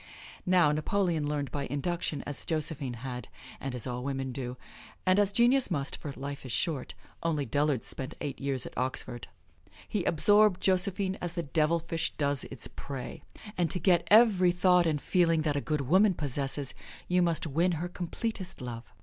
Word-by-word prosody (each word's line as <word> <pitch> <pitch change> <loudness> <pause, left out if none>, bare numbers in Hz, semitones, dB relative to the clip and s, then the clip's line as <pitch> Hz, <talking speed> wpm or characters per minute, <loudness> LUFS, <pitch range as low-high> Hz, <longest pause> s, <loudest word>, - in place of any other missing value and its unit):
Now, 180 -5 +5
Napoleon 160 0 0
learned 145 -3 -2
by 140 -1 -3
induction 150 0 -1
as 145 -1 -4
Josephine 150 -5 -1
had, 125 -3 -5 0.3
and 135 -2 -4
as 120 - -3
all 125 0 -4
women 135 -1 -2
do, 125 -1 -5 0.5
and 185 +2 +4
as 205 -1 +3
genius 240 +4 +4
must, 140 -6 -1
for 145 - -6
life 140 +1 -6
is 130 - -7
short 145 0 -1 0.3
only 155 -4 0
dullards 145 +1 0
spend 130 - -4
eight 140 - -4
years 135 -2 0
at - - -9
Oxford. 125 -1 -3 0.6
He 205 -4 -1
absorbed 205 +3 +4
Josephine 190 +1 +1
as 175 -1 -3
the 170 -1 -2
devilfish 165 +2 0
does 140 -2 -1
its 135 - -6
prey. 135 -3 -7 0.3
And 175 -2 +1
to - - -1
get 175 +1 +3
every 205 -5 +6
thought 180 -1 +4
and 150 -2 +1
feeling 165 -1 +2
that 150 -2 0
a 145 - 0
good 150 -1 -1
woman 185 +8 +4
possesses 140 -1 -2 0.3
you 180 0 +3
must 170 -2 +1
win 165 +4 +1
her 165 +2 -2
completest 180 +2 -4
love. 120 -2 -6
155 Hz, 175 wpm, -30 LUFS, 140-180 Hz, 0.6 s, every